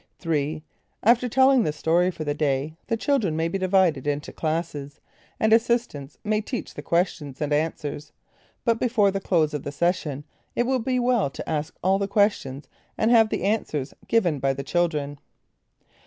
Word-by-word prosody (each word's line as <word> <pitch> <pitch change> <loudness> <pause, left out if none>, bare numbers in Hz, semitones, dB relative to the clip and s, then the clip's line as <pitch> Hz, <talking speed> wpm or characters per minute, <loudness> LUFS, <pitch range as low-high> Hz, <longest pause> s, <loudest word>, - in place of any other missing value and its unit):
3. 155 -2 -2 0.4
After 240 +3 +4
telling 265 +1 +5
the 155 - 0
story 165 +4 +2
for 165 -3 -5
the 145 -1 -1
day, 145 0 -1
the 230 - 0
children 225 - +1
may 165 +1 0
be 195 +4 -2
divided 185 -7 +2
into 145 0 -2
classes, 155 -3 -3 0.4
and 220 0 +3
assistants 225 - 0
may 215 0 +1
teach 245 +3 -5
the - - -7
questions 165 -6 -1
and 150 -1 -1
answers. 150 -1 -2 0.5
But 230 -2 +2
before 220 -5 +3
the 195 0 -3
close 160 -6 +1
of 150 - -2
the 140 - -5
session 155 -3 -1 0.3
it 240 - +1
would 255 -2 0
be 255 -1 +1
well 245 - +2
to - - -8
ask 155 0 -2
all 190 +2 +3
the 200 - -1
questions, 195 -10 0 0.3
and 220 +2 +2
have 225 -2 +6
the - - -2
answers 170 -9 -1
given 180 -11 +2
by 135 0 +1
the 140 +1 -5
children. 150 -2 -1
170 Hz, 175 wpm, -25 LUFS, 150-220 Hz, 0.5 s, have